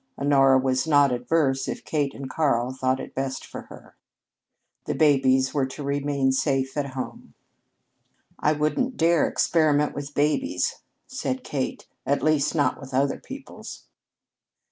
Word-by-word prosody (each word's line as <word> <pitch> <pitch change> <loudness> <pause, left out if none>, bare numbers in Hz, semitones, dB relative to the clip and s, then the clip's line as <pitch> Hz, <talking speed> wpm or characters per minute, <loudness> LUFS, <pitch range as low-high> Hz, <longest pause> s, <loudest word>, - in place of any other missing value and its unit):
Honora 135 -1 +4
was 130 +2 0
not 145 -3 +5
averse 135 +2 0
if - - -5
Kate 145 -3 -1
and 135 - -6
Karl 130 -4 0
thought 130 0 0
it - - -8
best 135 0 -3
for - - -8
her. - - -14 0.9
The - - -2
babies 130 -3 +3
were 140 -3 +1
to 140 +2 -8
remain 140 -1 0
safe 135 -1 0
at 140 -3 -3
home. 130 - -7 1.0
"I 150 - +2
wouldn't 155 - -1
dare 165 0 +3
experiment 150 -3 +2
with 145 0 -7
babies," 155 - 0 0.3
said 260 0 -4
Kate. 135 -3 -4 0.2
"At 140 - 0
least, 155 0 +2
not 145 -4 +1
with 135 -1 -7
other 135 +1 +1
people's." 270 +1 -10
140 Hz, 145 wpm, -25 LUFS, 130-150 Hz, 1.0 s, not